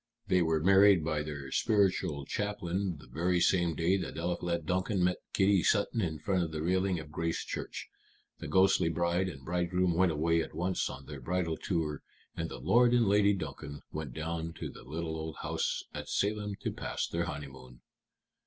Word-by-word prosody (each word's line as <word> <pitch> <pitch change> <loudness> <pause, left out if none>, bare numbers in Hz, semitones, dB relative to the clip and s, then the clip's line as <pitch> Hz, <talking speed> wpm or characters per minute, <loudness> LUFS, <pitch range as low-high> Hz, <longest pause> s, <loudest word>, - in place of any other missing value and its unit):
They 90 -1 +4
were 80 -2 +1
married 95 -2 +6
by 80 -2 0
their 70 -3 -6
spiritual 95 - +1
chaplain 95 -3 -2
the 75 - -14
very 85 +8 0
same 85 -2 +3
day 85 +5 +2
that 90 - -5
Eliphalet 85 -1 -2
Duncan 95 +2 0
met 90 0 +2
Kitty 95 -1 +4
Sutton 110 +4 +2
in 80 -5 -1
front 90 +4 0
of 80 -2 -2
the 80 -1 -3
railing 95 +1 +1
of 75 -1 -10
Grace 85 +1 -2
Church. - - -5 0.5
The - - -6
ghostly 95 -2 +4
bride 85 +3 +1
and 70 -6 -10
bridegroom 90 +1 +1
went 90 +1 +3
away 80 +2 +2
at - - -6
once 90 +2 0
on 70 - -8
their 75 -2 -8
bridal 85 +2 -1
tour, 80 -5 -2 0.3
and - - -3
Lord 120 0 +3
and 120 -1 +4
Lady 100 0 +4
Duncan 75 -4 -6
went 75 -6 -5
down 80 +1 -3
to - - -6
the - - -12
little 80 +4 -4
old 80 -1 -5
house - - -1
at - - -6
Salem 105 0 0
to - - -2
pass - - -3
their 85 +1 -1
honeymoon." 65 -5 -8
85 Hz, 180 wpm, -31 LUFS, 80-95 Hz, 0.5 s, married